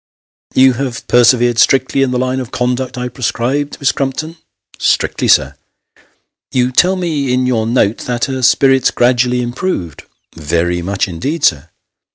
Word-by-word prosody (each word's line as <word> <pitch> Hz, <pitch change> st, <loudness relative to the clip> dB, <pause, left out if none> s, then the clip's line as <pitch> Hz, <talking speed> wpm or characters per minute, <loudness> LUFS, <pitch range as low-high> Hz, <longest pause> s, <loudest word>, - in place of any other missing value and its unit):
" -, -, -
You 130 Hz, 0 st, +5 dB
have 120 Hz, -2 st, -5 dB
persevered 120 Hz, -1 st, +3 dB
strictly 135 Hz, +1 st, +2 dB
in 135 Hz, -, +2 dB
the 125 Hz, -, -1 dB
line 130 Hz, +1 st, -1 dB
of 125 Hz, -3 st, -6 dB
conduct 125 Hz, 0 st, -2 dB
I 125 Hz, 0 st, -3 dB
prescribed, 130 Hz, +3 st, -2 dB
Miss 140 Hz, -, +2 dB
Crumpton? 140 Hz, +4 st, -4 dB, 0.2 s
" -, -, -64 dB
" -, -, -24 dB
Strictly, -, -, 0 dB
sir." -, -, +3 dB, 0.5 s
" -, -, -43 dB
You 125 Hz, 0 st, +1 dB
tell 180 Hz, +8 st, +3 dB
me 155 Hz, -8 st, -2 dB
in 125 Hz, 0 st, +1 dB
your 115 Hz, -3 st, 0 dB
note 115 Hz, -2 st, +1 dB
that 120 Hz, -1 st, -1 dB
her 130 Hz, -1 st, -4 dB
spirits 135 Hz, +1 st, +3 dB
gradually 125 Hz, 0 st, +1 dB
improved." 120 Hz, -, -4 dB, 0.2 s
" -, -, -34 dB
Very 85 Hz, +3 st, -1 dB
much 95 Hz, +3 st, -2 dB
indeed, 135 Hz, -, -4 dB
sir." 75 Hz, -4 st, +1 dB
125 Hz, 175 wpm, -14 LUFS, 120-135 Hz, 0.5 s, You